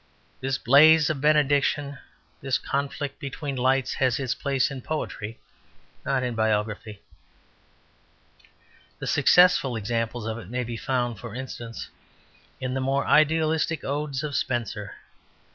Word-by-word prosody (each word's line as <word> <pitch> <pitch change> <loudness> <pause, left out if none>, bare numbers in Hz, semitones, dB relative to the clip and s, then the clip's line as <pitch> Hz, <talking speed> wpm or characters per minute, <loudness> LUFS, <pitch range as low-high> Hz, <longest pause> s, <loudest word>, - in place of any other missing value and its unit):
This 135 0 -1
blaze 155 +5 +6
of 145 -4 -4
benediction, 145 -1 +2 0.4
this 135 -2 0
conflict 140 0 -3
between 140 0 -5
lights, 130 +1 +1
has 130 -1 +1
its 130 -3 -1
place 140 0 0
in 135 -2 -6
poetry, 115 -7 -5 0.6
not 130 -2 0
in 125 -1 -2
biography. 105 -1 -2 1.9
The - - -6
successful 175 -8 +4
examples 115 +1 -2
of 110 +1 -3
it 95 - -11
may 125 +1 -2
be 120 0 -5
found, 120 -2 -2
for 115 +2 -8
instance, 120 -3 -7 0.7
in 130 -1 -3
the 135 - -1
more 135 +1 0
idealistic 160 +1 +2
odes 140 0 -3
of 145 -2 -3
Spenser. 110 -5 -2
130 Hz, 125 wpm, -25 LUFS, 115-145 Hz, 1.9 s, blaze